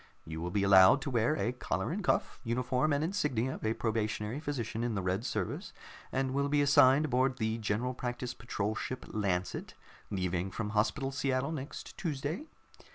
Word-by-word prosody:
You 80 0 -6
will 85 - -2
be 100 +2 0
allowed 95 +5 +7
to 140 - -3
wear 120 +5 +2
a 120 - 0
collar 125 +4 -2
and 200 +4 -3
cuff, - - 0
uniform 125 +4 +1
and 145 +1 +2
insignia 145 - 0
of - - -9
a 110 +1 +1
probationary 110 +2 -1
physician, 120 -7 -3
in 120 -2 -1
the 95 - -1
Red 95 +4 0
Service, - - -3 0.4
and 130 0 0
will 140 +1 +1
be 145 0 +3
assigned 140 +1 +6
aboard 130 -1 +1
the 110 0 -1
General 110 +4 -1
Practice 125 0 -4
Patrol 110 -4 -2
ship 125 +3 -5
Lancet, 95 -4 -2 0.3
leaving 90 -1 -1
from 105 +2 -4
Hospital 130 +6 +1
Seattle 135 +1 0
next 145 -2 -6
Tuesday. 155 - -3
125 Hz, 175 wpm, -32 LUFS, 105-140 Hz, 0.4 s, allowed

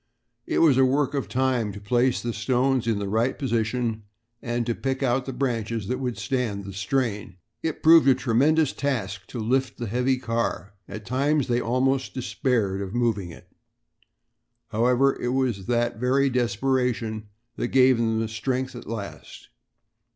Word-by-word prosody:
It - - +2
was 140 -5 +5
a - - +6
work 135 +2 +2
of 140 -2 -2
time 130 -4 0
to 100 - -8
place 120 +5 +1
the 120 -1 -2
stones 125 +2 +1
in 115 -3 +1
the 100 -1 -3
right 115 +5 0
position 115 -3 -1 0.4
and 120 0 -2
to 120 - 0
pick 135 +3 -3
out 130 0 +1
branches 115 -5 -2
that 125 +1 -1
would 125 -3 -3
stand 120 -7 -2
the 100 - -7
strain. 100 -1 -2 0.3
It 160 -2 -3
proved 160 -2 +7
a 135 - +6
tremendous 135 +5 +2
task 100 -9 -3
to - - -8
lift 130 +4 0
the 120 - -4
heavy 125 +4 +1
car. 115 -4 -2 0.2
At 105 0 -8
times 140 +4 +1
they 120 0 +1
almost 130 0 0
despaired 115 -6 -1
of 100 +3 -5
moving 110 -7 0
it. 80 - -13 1.2
However, 125 +5 +2
it 125 +1 -1
was 125 -8 -1
that 120 -1 0
very 135 +2 +2
desperation 120 -2 -1 0.3
that - - -1
gave 130 -1 +4
them 115 -1 0
strength 130 +4 -3
at 120 - -9
last. 110 -3 -8
120 Hz, 160 wpm, -25 LUFS, 110-130 Hz, 1.2 s, proved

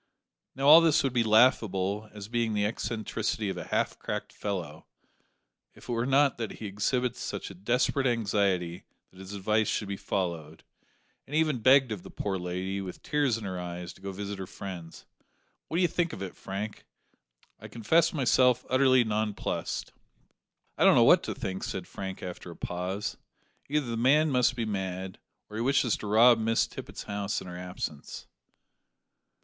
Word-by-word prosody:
Now, 135 +1 0
all 160 +3 +10
this 165 -3 +4
would 135 -2 0
be 120 -2 +3
laughable, 110 -3 +3
as 105 -1 -9
being 115 -1 -1
the 105 0 +1
eccentricity 110 -1 -2
of - - -6
a - - -5
half - - -1
cracked - - -5
fellow, 85 -6 -5 0.9
if - - -15
it - - -4
were 115 +1 0
not 135 -1 +3
that 110 -2 -3
he 110 - -8
exhibits 115 +5 -1
such - - -5
a - - -9
desperate 125 +7 +1
anxiety 100 -6 0 0.3
that 95 - -17
his 95 +1 -9
advice 105 +2 +1
should 105 - -1
be 100 0 -4
followed, 85 -6 -3 0.6
and 145 - -5
even 155 -5 +2
begged 130 +1 +5
of 105 -4 -4
the - - -11
poor 95 -2 -3
lady, 90 +2 -3
with 95 -2 -8
tears 145 -6 +1
in 115 - -8
his 95 - -4
eyes, 90 0 -6
to - - -20
go 100 - -5
to 95 - -8
visit 100 -1 -5
her 95 - -5
friends. 90 -4 -8 0.6
What 165 - -2
d'ye 180 - +4
think 170 0 0
of 95 - -5
it, 95 - -7
Frank? 100 +2 -6 0.8
I - - -9
confess 160 +9 +2
myself 125 -3 +3
utterly 130 -1 +5
nonplussed." 110 -1 -2 0.9
"I - - +4
don't - - +7
know - - +6
what - - +6
to - - -4
think," 95 0 -4
said - - -4
Frank 95 -1 -7
after 90 0 -7
a 85 - -9
pause. 95 +4 -4 0.5
"Either 150 -1 +1
the 115 -1 -3
man 145 +6 +4
must 125 -1 +3
be 115 -2 -2
mad, 95 -2 -4 0.3
or 105 - -8
he - - -1
wishes 125 -2 +2
to 105 - -7
rob 115 +3 +6
Miss 115 +1 +2
Tippet's - - -8
house 100 +2 -2
in - - -10
her 90 -1 -8
absence." 90 -5 -6
105 Hz, 180 wpm, -28 LUFS, 95-125 Hz, 0.9 s, all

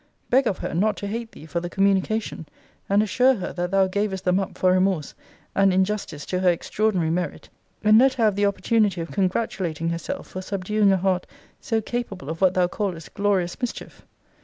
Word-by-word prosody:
Beg 260 0 +4
of 195 - 0
her - - -4
not 205 +6 +1
to - - -5
hate 225 +3 -4
thee - - -12
for 170 +2 -2
the 175 0 -5
communication; 195 -2 0 0.4
and 200 +2 +4
assure 250 +5 +3
her, 190 - -5
that 175 0 -2
thou 195 0 +3
gavest 190 0 -2
them 180 +1 +3
up 195 - -4
for 185 - +3
remorse, 185 -5 +1 0.4
and 195 0 +4
in 190 +1 +3
justice 185 -8 -5
to 180 - -2
her 185 -1 +4
extraordinary 180 -1 0
merit: 175 -2 -3 0.3
and 215 +1 +6
let 265 +1 +5
her 240 - 0
have 210 -3 +3
the 205 0 +2
opportunity 200 -1 +1
of 165 - -5
congratulating 180 -4 -1
herself 170 -1 -4
for 185 - -6
subduing 200 +2 +1
a 190 - +3
heart 185 -1 0 0.3
so 225 -1 -1
capable 205 - -4
of 165 - -7
what 185 -1 +4
thou 180 -1 +4
callest 180 -4 -4
glorious 200 -1 0
mischief. 245 - -5
190 Hz, 200 wpm, -24 LUFS, 180-210 Hz, 0.4 s, and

